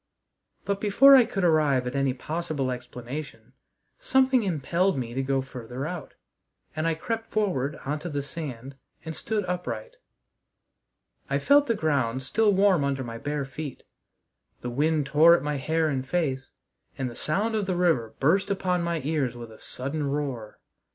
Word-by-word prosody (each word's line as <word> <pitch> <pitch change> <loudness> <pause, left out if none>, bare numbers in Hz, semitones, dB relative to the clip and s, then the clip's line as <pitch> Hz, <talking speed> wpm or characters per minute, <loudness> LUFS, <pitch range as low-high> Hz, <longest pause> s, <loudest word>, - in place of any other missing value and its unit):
But, 200 0 -1
before 270 +7 +7
I 255 -3 +7
could 195 -4 -3
arrive 150 -6 +3
at 125 +2 -4
any 135 -1 +2
possible 150 -2 -3
explanation, 125 0 -7 0.5
something 265 - +3
impelled 175 0 0
me 120 -2 -4
to 135 - -1
go 135 0 0
farther 125 0 -6
out, 165 -2 -6 0.6
and 155 +1 0
I 165 - +1
crept 225 +7 -4
forward 155 -10 0
on 150 +2 -2
to 175 - -6
the 145 -2 -2
sand 140 -4 -7 0.3
and 160 0 -5
stood 215 -3 -2
upright. 150 -12 -4 1.3
I 140 - +1
felt 285 - +4
the 230 - +2
ground 135 - 0
still 210 +11 +2
warm 190 -5 +4
under 135 -1 -1
my 115 -1 -7
bare 145 +2 -2
feet; 135 +1 -7 0.8
the 120 - -4
wind 150 +3 +1
tore 155 +4 +6
at - - -2
my 150 -1 -1
hair 160 +4 0
and 135 -3 -1
face; 135 -3 -1 0.5
and 130 - -2
the 120 - -7
sound 205 +9 0
of 210 -3 -1
the 185 - 0
river 160 -11 +1
burst 190 +8 +2
upon 185 -3 0
my 170 -2 -1
ears 140 -5 -1
with 120 -1 -9
a 110 - -14
sudden 140 +3 -4
roar. 135 -7 -4
150 Hz, 170 wpm, -26 LUFS, 130-180 Hz, 1.3 s, before